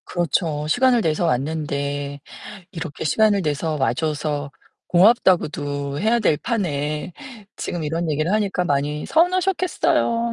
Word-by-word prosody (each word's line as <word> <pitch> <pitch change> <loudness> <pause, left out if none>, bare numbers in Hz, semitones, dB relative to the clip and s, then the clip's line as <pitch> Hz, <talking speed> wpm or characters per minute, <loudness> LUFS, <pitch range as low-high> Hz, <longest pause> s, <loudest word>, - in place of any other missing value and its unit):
그렇죠. 160 -3 -1
시간을 245 +5 +3
내서 160 0 0
왔는데 145 0 -2 0.5
이렇게 165 -4 -6
"시간을 205 +5 +3
내서 155 0 -1
와줘서 145 +2 -1 0.4
고맙다."고도 150 -8 +2
해야 225 +3 +2
될 160 -8 +2
판에 150 - -2 0.4
지금 175 - -4
이런 165 +2 -2
얘기를 155 +4 0
하니까 200 -4 0
많이 145 -1 -1
서운하셨겠어요.. 350 -9 +1
160 Hz, 295 characters per minute, -22 LUFS, 145-205 Hz, 0.5 s, 시간을